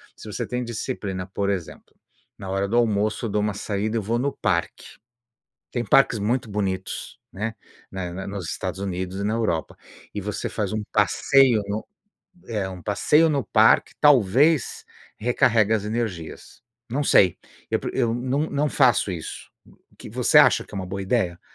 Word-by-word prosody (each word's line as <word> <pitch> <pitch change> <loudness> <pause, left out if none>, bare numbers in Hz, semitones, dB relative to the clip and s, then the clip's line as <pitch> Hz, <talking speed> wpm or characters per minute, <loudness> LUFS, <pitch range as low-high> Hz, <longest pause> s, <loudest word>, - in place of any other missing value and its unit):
Se - - -12
você - - -3
tem 125 0 -3
disciplina, 105 -5 -4
por 100 +1 -2
exemplo, 95 -5 -5 0.4
na 95 - -8
hora 95 +1 0
do 110 - -2
almoço, 110 -1 +1
eu - - -2
dou 105 - 0
uma 105 0 0
saída, 105 +2 -3
eu - - 0
vou 115 +4 -1
no 140 +3 -1
parque. 85 -2 -2 0.7
Tem 120 - -2
parques 120 +1 +4
muito 115 +3 -1
bonitos, 100 -2 -3
né. 110 +3 -4 0.4
Na 90 -2 -5
na 95 +1 -6
nos 100 -4 -5
Estados - - -4
Unidos 95 0 -4
e - - -2
na 105 - 0
Europa, 105 -9 -1 0.4
e 105 - -3
você 105 +1 -4
faz 105 -4 -2
um 110 - -2
passeio 130 -6 +4
no 105 +2 -4 0.6
eh, 105 -5 -2
um 90 -2 -9
passeio 150 - +3
no 140 -2 0
parque, - - +4
talvez 140 - +4 0.3
recarregue 115 -1 +2
as 110 -2 +1
energias. 105 -7 -5 0.3
Não 140 +5 0
sei, 95 - +4 0.3
eu - - +1
pre - - -4
eu 120 -3 +1
não 130 +5 -1
não 145 +1 0
faço 125 -8 +3
isso. 85 -4 -7 0.4
O - - -26
que - - -11
você - - +2
acha - - +5
que - - -14
é - - -4
uma 95 - -3
boa 95 +2 -5
ideia? 95 -4 0
105 Hz, 180 wpm, -24 LUFS, 95-120 Hz, 0.7 s, acha